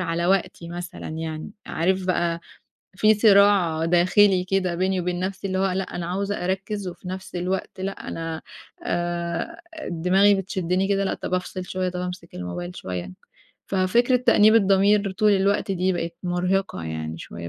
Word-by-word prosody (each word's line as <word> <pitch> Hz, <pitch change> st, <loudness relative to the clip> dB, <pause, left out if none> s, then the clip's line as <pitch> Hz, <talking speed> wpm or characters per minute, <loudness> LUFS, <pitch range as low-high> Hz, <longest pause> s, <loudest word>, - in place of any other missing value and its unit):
على 170 Hz, -1 st, -1 dB
وقتي 185 Hz, -2 st, 0 dB
مثلًا 175 Hz, +1 st, -7 dB
يعني، 160 Hz, +1 st, -5 dB, 0.2 s
عارف 185 Hz, +3 st, 0 dB
بقى، 170 Hz, -2 st, 0 dB, 0.6 s
في 215 Hz, +3 st, +5 dB
صراع 200 Hz, -6 st, +4 dB
داخلي 180 Hz, +2 st, +4 dB
كده 185 Hz, -1 st, 0 dB
بيني 185 Hz, +1 st, 0 dB
وبين 175 Hz, 0 st, -2 dB
نفسي، 190 Hz, +1 st, -3 dB
اللي 185 Hz, 0 st, -1 dB
هو 195 Hz, 0 st, +2 dB
لأ، 190 Hz, +1 st, -1 dB
أنا 175 Hz, -1 st, -3 dB
عاوزة 195 Hz, +2 st, -2 dB
أركِّز، 190 Hz, +2 st, -2 dB
وفي 180 Hz, +1 st, -9 dB
نفس 190 Hz, +1 st, -7 dB
الوقت 185 Hz, +2 st, -3 dB
لأ، 195 Hz, +1 st, -5 dB
أنا 165 Hz, -1 st, -4 dB, 0.4 s
آآ، 175 Hz, -, -2 dB, 0.3 s
دماغي 185 Hz, +4 st, +4 dB
بتشدِّني 190 Hz, -1 st, -1 dB
كده، 195 Hz, -1 st, +1 dB
لأ، -, -, 0 dB
طَب -, -, -4 dB
أفصِل 185 Hz, 0 st, -3 dB
شوية، 185 Hz, 0 st, -2 dB
طَب 180 Hz, 0 st, -4 dB
أمسك 180 Hz, -1 st, -6 dB
الموبايل 175 Hz, -, -5 dB
شوية، 90 Hz, -1 st, -5 dB, 0.6 s
ففكرة 215 Hz, +7 st, +3 dB
تأنيب 220 Hz, -3 st, +5 dB
الضمير 200 Hz, 0 st, +4 dB
طول 210 Hz, +1 st, +3 dB
الوقت 200 Hz, +1 st, +1 dB
دي 185 Hz, 0 st, +1 dB
بقِت 170 Hz, -1 st, -3 dB
مرهقة 180 Hz, -, -1 dB
يعني 80 Hz, 0 st, -5 dB
شوية 85 Hz, 0 st, -8 dB
185 Hz, 160 wpm, -24 LUFS, 175-195 Hz, 0.6 s, في